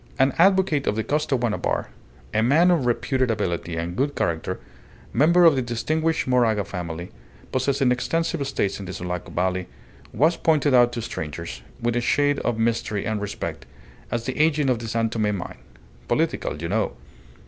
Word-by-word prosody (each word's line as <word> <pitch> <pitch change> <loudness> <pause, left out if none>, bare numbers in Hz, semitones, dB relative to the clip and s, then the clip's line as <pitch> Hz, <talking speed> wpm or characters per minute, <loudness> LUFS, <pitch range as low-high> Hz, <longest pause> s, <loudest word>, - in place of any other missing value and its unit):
An 135 0 +3
advocate 185 -6 +4
of 105 - +1
the 110 - -1
Costaguana 135 -6 0
Bar, - - -1 0.4
a 110 - +2
man 155 +10 +4
of 155 -8 +2
reputed 130 +1 +1
ability 85 -6 -2
and 85 +1 -3
good 140 +2 0
character, 85 -2 -1 0.5
member 170 +7 +5
of 160 -4 +7
the 130 - +1
distinguished 155 +7 0
Moraga 115 -5 +3
family 85 -2 -6 0.4
possessing 130 0 +1
extensive 165 +5 0
estates 105 -8 -1
in 100 - -7
the 90 - -5
Sulaco 90 0 -5
Valley, 90 0 -1 0.4
was 160 +4 +2
pointed 150 -3 +2
out 120 -1 +6
to 115 - -3
strangers, 80 -4 -6 0.2
with 120 0 0
a 120 - +1
shade 145 +3 +2
of 120 -2 -1
mystery 115 -2 0
and 110 -2 -1
respect, 105 - -5 0.4
as 120 0 -2
the 130 - -3
agent 150 -3 +3
of 120 - 0
the 115 - -6
San 115 0 0
Tome 105 -3 0
mine 90 - -7 0.5
"political, 75 - -1
you 85 - -3
know." 110 +5 0
120 Hz, 170 wpm, -24 LUFS, 105-145 Hz, 0.5 s, of